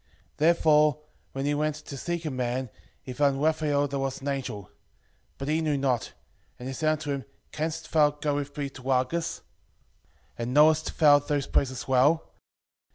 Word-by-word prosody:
5:4 -, -, -40 dB, 0.3 s
Therefore 150 Hz, -2 st, +4 dB, 0.3 s
when 135 Hz, +1 st, -3 dB
he 145 Hz, -, +1 dB
went 150 Hz, 0 st, 0 dB
to 150 Hz, -1 st, -9 dB
seek 170 Hz, +4 st, -4 dB
a 155 Hz, -, -2 dB
man, 125 Hz, -1 st, -2 dB, 0.3 s
he 130 Hz, -, -7 dB
found 140 Hz, +1 st, +2 dB
Raphael 150 Hz, -2 st, +1 dB
that 140 Hz, 0 st, -3 dB
was 135 Hz, -1 st, -2 dB
an 140 Hz, -, -4 dB
angel. 130 Hz, -7 st, -3 dB
5:5 -, -, -22 dB, 0.7 s
But 135 Hz, -, -5 dB
he 155 Hz, +2 st, +1 dB
knew 150 Hz, -3 st, 0 dB
not; 130 Hz, -4 st, -1 dB, 0.4 s
and 125 Hz, -, -8 dB
he 135 Hz, -, -4 dB
said 155 Hz, +3 st, +1 dB
unto 150 Hz, -1 st, -4 dB
him, 140 Hz, -1 st, -3 dB, 0.3 s
Canst 160 Hz, +1 st, -4 dB
thou 150 Hz, -2 st, +5 dB
go 150 Hz, 0 st, -2 dB
with 145 Hz, 0 st, -4 dB
me 145 Hz, -1 st, -2 dB
to 130 Hz, -, -12 dB
Rages? 130 Hz, +6 st, -1 dB, 1.0 s
and 120 Hz, +3 st, -3 dB
knowest 155 Hz, +1 st, +4 dB
thou 145 Hz, -2 st, +7 dB
those 145 Hz, -1 st, -2 dB
places 130 Hz, -2 st, -1 dB
well? 140 Hz, +5 st, +2 dB
145 Hz, 180 wpm, -27 LUFS, 135-155 Hz, 1.0 s, thou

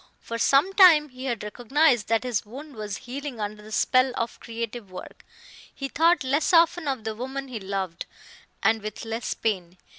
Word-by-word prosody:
For 230 Hz, 0 st, -6 dB
some 285 Hz, +11 st, +3 dB
time 340 Hz, -6 st, +7 dB
he 255 Hz, 0 st, -9 dB
had 235 Hz, -5 st, -2 dB
recognized 245 Hz, +2 st, +2 dB
that 225 Hz, +1 st, +1 dB
his 245 Hz, -4 st, -1 dB
wound 275 Hz, +7 st, -10 dB
was 210 Hz, -2 st, -5 dB
healing 265 Hz, 0 st, -6 dB
under 210 Hz, 0 st, -4 dB
the 215 Hz, +1 st, -13 dB
spell 255 Hz, +3 st, +3 dB
of 230 Hz, 0 st, -3 dB
creative 230 Hz, -2 st, -6 dB
work; 185 Hz, 0 st, -10 dB, 0.5 s
he 275 Hz, -, -5 dB
thought 330 Hz, +1 st, +3 dB
less 280 Hz, +7 st, +1 dB
often 335 Hz, -1 st, +4 dB
of 265 Hz, -5 st, -2 dB
the 220 Hz, 0 st, -3 dB
woman 265 Hz, +4 st, -5 dB
he 235 Hz, -3 st, -5 dB
loved, 190 Hz, -3 st, -4 dB, 0.6 s
and 220 Hz, 0 st, +3 dB
with 215 Hz, +2 st, -6 dB
less 225 Hz, +1 st, -3 dB
pain. 185 Hz, -5 st, -2 dB
240 Hz, 180 wpm, -25 LUFS, 215-275 Hz, 0.6 s, time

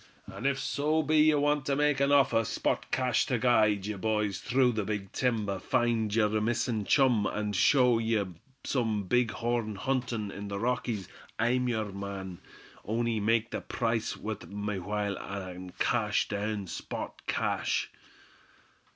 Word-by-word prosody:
"An' 135 Hz, -, -4 dB
if 140 Hz, -1 st, +1 dB
so 155 Hz, +3 st, 0 dB
be 155 Hz, +2 st, +2 dB
ye 155 Hz, 0 st, +6 dB
wanter 145 Hz, -1 st, +1 dB
make 150 Hz, -1 st, +2 dB
me 140 Hz, -, +4 dB
a -, -, 0 dB
offer, 140 Hz, -5 st, +4 dB
spot -, -, -1 dB
cash, 125 Hz, -3 st, +1 dB
ter 125 Hz, -, +1 dB
guide 110 Hz, -5 st, +3 dB
ye 105 Hz, -, -2 dB
boys 105 Hz, -1 st, 0 dB
through 130 Hz, 0 st, +2 dB
the 110 Hz, -2 st, -1 dB
big 100 Hz, -2 st, -4 dB
timber, 110 Hz, -6 st, 0 dB
find 115 Hz, -3 st, +1 dB
yer 110 Hz, -1 st, +2 dB
missin' 115 Hz, -1 st, 0 dB
chum, 125 Hz, -6 st, +3 dB
and 105 Hz, -1 st, -2 dB
show 125 Hz, +2 st, +4 dB
ye 110 Hz, -2 st, +1 dB, 0.4 s
some 110 Hz, -6 st, 0 dB
big 120 Hz, +5 st, +2 dB
horn 115 Hz, -2 st, -2 dB
huntin' 115 Hz, -2 st, -2 dB
in 100 Hz, +1 st, -7 dB
the 100 Hz, 0 st, -4 dB
Rockies, 115 Hz, -3 st, -1 dB, 0.3 s
I'm 125 Hz, +2 st, +1 dB
yer 110 Hz, -3 st, -1 dB
man; 95 Hz, -2 st, -6 dB, 0.4 s
on'y 115 Hz, +1 st, 0 dB
make 115 Hz, +2 st, +1 dB
the -, -, -3 dB
price 115 Hz, -2 st, -1 dB
wuth 110 Hz, -1 st, -5 dB
my 105 Hz, -1 st, -3 dB
while, 100 Hz, +1 st, -2 dB
an' 95 Hz, -2 st, -7 dB
cash 105 Hz, -4 st, +1 dB
down, 105 Hz, 0 st, -2 dB
spot 90 Hz, -, -6 dB
cash." -, -, 0 dB
110 Hz, 155 wpm, -29 LUFS, 105-125 Hz, 0.4 s, ye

